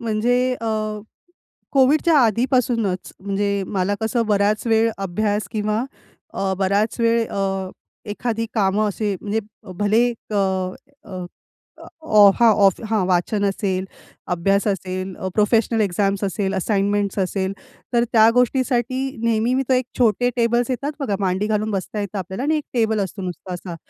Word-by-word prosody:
म्हणजे 230 +2 +1 0.2
अ, 230 - -4 1.1
COVIDच्या 295 +4 +4
आधीपासूनच, 230 -4 +1
म्हणजे 200 0 -1
मला 195 +1 -1
कसं 225 +1 0
बऱ्याच 210 +1 +1
वेळ 225 0 +3
अभ्यास 205 +1 -1
किंवा 215 +2 -1 0.5
अ, 195 -1 -1
बराच 200 +4 0
वेळ 230 0 +2
अ, 195 -1 -2 0.4
एखादी 230 +1 -2
कामं 210 0 +2
असे 205 0 -2
म्हणजे 215 +1 -1 0.4
भले 205 +2 +2
एक 230 -2 -9
अ, 190 -2 0 0.4
अ, 185 -1 -5 0.8
ऑ 210 -9 +6
हां, 235 -2 +6
ऑफ 195 -2 +3
हां 215 -4 +2
वाचन 190 +3 +1
असेल, 195 -1 -1 0.5
अभ्यास 195 +4 +1
असेल, 185 -1 -3
अ, 190 - -4
प्रोफेशनल 225 +2 +2
एक्झाम्स 195 0 0
असेल, 195 0 -1
असाइनमेंट्स 200 +1 0
असेल, 190 0 -1 0.4
तर 235 0 +4
त्या 220 -1 +6
गोष्टीसाठी 250 0 +1 0.2
नेहमी 230 +2 +2
मी 270 - +1
तो - - +3
एक 255 0 +1
छोटे 245 0 +3
टेबल्स 240 +1 +1
येतात 275 +4 -2
बघा 210 -8 -1
मांडी 190 +2 0
घालून 215 0 0
बसता 200 +1 -3
येतं 200 0 -4
आपल्याला 190 +5 -5
आणि 310 +3 +1
एक 300 - -6
टेबल 220 -3 +1
असतो 195 +1 -4
नुसता 180 0 -6
असा. 175 0 -7
210 Hz, 150 wpm, -21 LUFS, 195-230 Hz, 1.1 s, ऑ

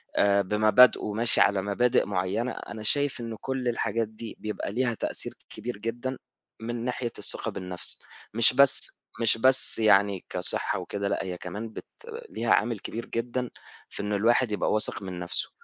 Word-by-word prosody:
آآ 100 0 +4
بمبادئه 105 +2 +4
ماشي 115 +2 +3
على 100 -1 +3
مبادئ 105 +5 +2
معيّنة 100 +5 -1
أنا 110 -2 -8
شايف 140 +1 +1
إنه 115 -2 -6
كل 130 -2 -3
الحاجات 115 -1 0
دي 110 +1 -9
بيبقى 105 -1 -4
ليها 120 +1 0
تأثير - - -4 0.2
كبير 120 -3 -6
جدًا 120 +4 -4 0.4
من 120 +1 -4
ناحية 125 -1 -2
الثقة - - -1
بالنَفْس، 90 -1 -4 0.3
مش 115 +2 +6
بس 140 +1 +4 0.2
مش 115 0 +4
بس 130 -1 +4
يعني 100 -3 +3
كصحة - - -1
وكده 100 0 -4
لأ، - - -1
هي 90 -2 -5
كمان 105 +6 -6
بت - - -9 0.4
ليها 115 - -2
عامل 110 -1 +1
كبير 115 +2 -6
جدًا 120 +1 -3 0.4
في - - -6
إنه 105 0 -1
الواحد 115 +2 +2
يبقى 105 - 0
واثق 105 -1 0
من 90 -2 -6
نَفْسه. 90 0 -2
110 Hz, 165 wpm, -27 LUFS, 100-120 Hz, 0.4 s, مش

